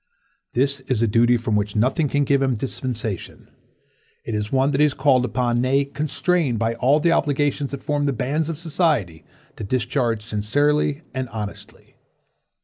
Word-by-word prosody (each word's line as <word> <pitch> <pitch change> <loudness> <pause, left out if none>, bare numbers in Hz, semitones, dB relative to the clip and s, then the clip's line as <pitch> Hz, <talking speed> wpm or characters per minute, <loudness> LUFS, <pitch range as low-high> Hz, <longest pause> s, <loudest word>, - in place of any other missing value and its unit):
This 140 +3 +2
is 120 -3 +1
a - - +3
duty 120 +3 +3
from 115 -2 -1
which 105 0 -1
nothing 135 +8 +1
can 145 +1 +1
give 140 0 +2
him 135 -1 +2
a - - -3
dispensation. 115 -5 -5 0.7
'T - - -4
is 105 -1 -3
one 135 +1 +2
that 140 - -1
he 150 - +6
is 145 - -3
called 130 -4 +3
upon, 120 0 0
nay, 135 +2 +2
constrained 150 -1 0
by 115 +1 0
all 130 +6 +2
the 170 +2 +2
obligations 145 -3 +1
that 140 -1 -7
form 145 -1 0
the 140 - +1
bands 145 +6 -1
of 165 - -4
society, 150 - 0 0.3
to - - -6
discharge 120 0 -1
sincerely 145 +8 0
and 130 -2 -3
honestly. 105 -2 -8
130 Hz, 175 wpm, -22 LUFS, 115-145 Hz, 0.7 s, he